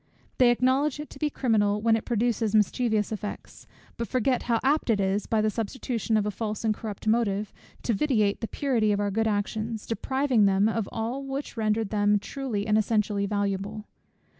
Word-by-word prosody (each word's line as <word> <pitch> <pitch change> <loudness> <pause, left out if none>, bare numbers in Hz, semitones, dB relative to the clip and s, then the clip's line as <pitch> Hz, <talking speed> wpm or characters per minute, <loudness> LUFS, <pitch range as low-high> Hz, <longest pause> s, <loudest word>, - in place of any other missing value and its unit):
They 250 -2 +6
acknowledge 260 +4 +2
it 300 - -7
to - - -11
be 300 - +1
criminal 210 -7 +1
when 225 +1 +3
it 225 - -3
produces 230 -2 0
mischievous 215 0 +2
effects, 210 -1 -7 0.3
but 235 - -3
forget 255 0 +1
how 230 -1 +3
apt 285 0 +2
it 215 -3 +3
is, 195 +1 0
by 220 -1 +2
the 215 0 +1
substitution 225 0 -2
of 210 - +1
a 210 - -1
false 215 +1 -4
and 220 -1 +2
corrupt 210 -1 -7
motive, 215 -2 +1 0.3
to 235 - +1
vitiate 215 -4 +1
the 225 - -2
purity 235 -7 +1
of 205 - +1
our 205 0 0
good 225 +3 +1
actions, 215 +1 -2
depriving 265 -1 +1
them 195 +2 +3
of 220 -2 -1
all 235 +5 -3
which 275 0 -5
rendered 215 -1 0
them 205 -1 +3
truly 225 -2 -4
and 215 0 +3
essentially 210 -2 0
valuable. 205 +1 -2
220 Hz, 190 wpm, -27 LUFS, 205-240 Hz, 0.3 s, They